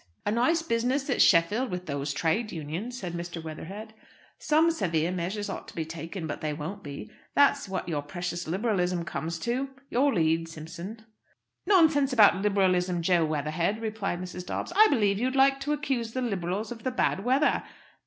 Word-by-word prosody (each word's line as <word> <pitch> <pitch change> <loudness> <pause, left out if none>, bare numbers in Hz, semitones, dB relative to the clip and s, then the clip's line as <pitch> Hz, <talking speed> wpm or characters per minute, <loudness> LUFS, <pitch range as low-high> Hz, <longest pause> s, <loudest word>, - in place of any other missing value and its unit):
"A 205 - +1
nice 290 +9 +2
business 260 +1 0
at - - +2
Sheffield 205 +9 +4
with 180 -1 -4
those 140 -2 -3
Trades 205 +10 0
Unions," 170 +10 -5
said 180 -7 -5
Mr. 170 0 -5
Weatherhead. 195 +7 -8 0.5
"Some 315 +2 +3
severe 170 - 0
measures 185 +4 -3
ought - - -6
to - - -12
be 160 - -2
taken; 165 +2 -6
but 150 - -5
they 155 -1 -1
won't 160 +7 -6
be. 145 +9 -8 0.2
That's 280 -5 +4
what 185 -1 -3
your 155 -4 -1
precious 175 +3 -5
Liberalism 180 -2 0
comes 170 0 -4
to! 255 +5 -1 0.2
Your 275 +4 +3
lead, 165 -3 +1
Simpson." 170 +7 -8 0.6
"Nonsense 320 -8 +4
about 215 -6 +6
Liberalism, 185 -3 +2
Jo 175 -1 +3
Weatherhead," 155 +7 -1
replied 215 -5 -3
Mrs. 180 0 -6
Dobbs. 180 - -4
"I 430 +2 +8
believe 205 -7 +2
you'd 255 +3 0
like 270 0 +4
to 285 +2 -2
accuse 270 -7 -1
the 255 - -2
Liberals 200 0 -2
of 230 -2 -7
the 255 - -1
bad 225 -6 0
weather. 260 +5 +2
195 Hz, 175 wpm, -28 LUFS, 170-245 Hz, 0.6 s, I